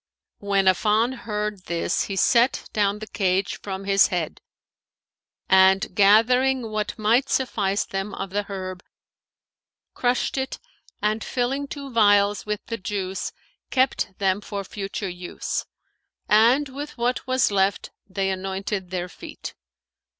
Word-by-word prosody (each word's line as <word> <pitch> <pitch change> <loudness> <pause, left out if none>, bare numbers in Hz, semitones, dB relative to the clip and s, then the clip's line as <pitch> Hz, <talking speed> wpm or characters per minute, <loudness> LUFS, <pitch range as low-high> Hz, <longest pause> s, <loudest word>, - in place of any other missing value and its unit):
When 200 -1 +1
Affan 215 +6 +3
heard 210 -5 -4
this, 170 +1 -1
he 195 - -4
set 240 +6 +3
down 205 -1 +1
the 215 - -7
cage 190 -2 0
from 195 -1 -5
his 195 0 +4
head 175 -4 -3 1.1
and, 190 +2 +5
gathering 230 +4 +4
what 215 +2 -2
might 235 +5 +2
suffice 205 -6 0
them 195 +1 -4
of 195 -1 -5
the 205 +1 0
herb, 185 -2 -5 1.1
crushed 250 +2 0
it 265 - -3 0.5
and 215 +1 +1
filling 265 +3 -1
two 280 -1 -7
vials 205 -2 +3
with 210 0 -3
the 230 - -4
juice 190 -1 -3 0.4
kept 260 -7 +1
them 195 0 +1
for 200 -1 -5
future 195 +1 -5
use; 180 -1 -4 0.6
and 235 +7 +5
with 285 +2 -7
what 245 +2 -1
was 255 -4 +2
left 195 0 +1 0.2
they 195 0 -1
anointed 190 0 -3
their 180 -1 -3
feet. - - -9
205 Hz, 130 wpm, -24 LUFS, 195-235 Hz, 1.1 s, and